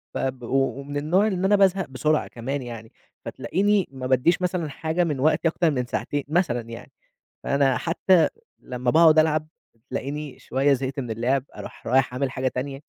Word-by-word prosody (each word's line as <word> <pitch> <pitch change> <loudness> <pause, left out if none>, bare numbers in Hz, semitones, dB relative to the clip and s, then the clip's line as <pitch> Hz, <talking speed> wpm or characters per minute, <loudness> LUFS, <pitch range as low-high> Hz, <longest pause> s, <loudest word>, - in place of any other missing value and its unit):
بب 130 -2 -3
و 135 +2 0
ومن 145 +1 -5
النوع 175 +9 +2
إن 190 -2 -1
أنا 205 +1 +4
بازهق 195 -1 +3
بسرعة 150 +4 0
كمان 135 +4 -4
يعني. 115 -2 -9 0.3
فتلاقيني 205 0 0
ما 130 -1 -5
بادّيش 130 +8 +2
مثلًا 180 -3 -1
حاجة 160 +4 -1
من 150 -5 -2
وقتي 155 +4 +2
أكتر 165 0 +1
من 125 -3 -1
ساعتين، 145 +3 -3
مثلًا 155 -7 +1
يعني. 115 - -10 0.5
فأنا 140 -3 +2
حتى 170 +3 +3 0.3
لمّا 125 -1 -2
باقعد 160 0 +6
ألعب 155 -1 +2 0.4
تلاقيني 145 0 -5
شوية 140 +2 +1
زهقت 135 +1 -3
من 120 -4 -4
اللعب، 125 +4 0
أرُوح - - -10
رايح 130 0 +2
عامل 130 +1 -1
حاجة 130 0 -2
تانية، 135 +2 -4
140 Hz, 170 wpm, -24 LUFS, 130-165 Hz, 0.5 s, باقعد